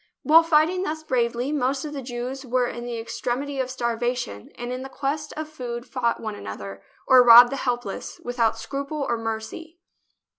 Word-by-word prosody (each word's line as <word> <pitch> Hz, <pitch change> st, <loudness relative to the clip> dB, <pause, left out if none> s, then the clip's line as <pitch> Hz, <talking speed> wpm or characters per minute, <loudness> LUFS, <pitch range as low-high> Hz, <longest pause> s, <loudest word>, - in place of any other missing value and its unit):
While 320 Hz, +2 st, +7 dB
fighting 330 Hz, +3 st, +3 dB
thus 315 Hz, -4 st, -3 dB
bravely, 245 Hz, -1 st, 0 dB
most 275 Hz, -1 st, 0 dB
of 300 Hz, -, -6 dB
the 280 Hz, -, -4 dB
Jews 250 Hz, +2 st, -5 dB
were 250 Hz, -1 st, +1 dB
in 240 Hz, 0 st, -5 dB
the 240 Hz, -1 st, -4 dB
extremity 250 Hz, +4 st, -3 dB
of 255 Hz, -1 st, -1 dB
starvation 240 Hz, -, -3 dB
and 240 Hz, +1 st, -5 dB
in 255 Hz, -, -5 dB
the 265 Hz, -, -7 dB
quest 290 Hz, +3 st, -3 dB
of 310 Hz, 0 st, -4 dB
food 245 Hz, -5 st, -6 dB
fought 235 Hz, -3 st, -1 dB
one 215 Hz, -1 st, -4 dB
another, 100 Hz, -, -8 dB, 0.2 s
or 260 Hz, -1 st, +7 dB
robbed 240 Hz, 0 st, +9 dB
the 275 Hz, -, -2 dB
helpless, 245 Hz, -6 st, -3 dB
without 230 Hz, -2 st, 0 dB
scruple 280 Hz, +4 st, -4 dB
or -, -, +1 dB
mercy. 225 Hz, +10 st, -6 dB
250 Hz, 180 wpm, -24 LUFS, 235-280 Hz, 0.2 s, robbed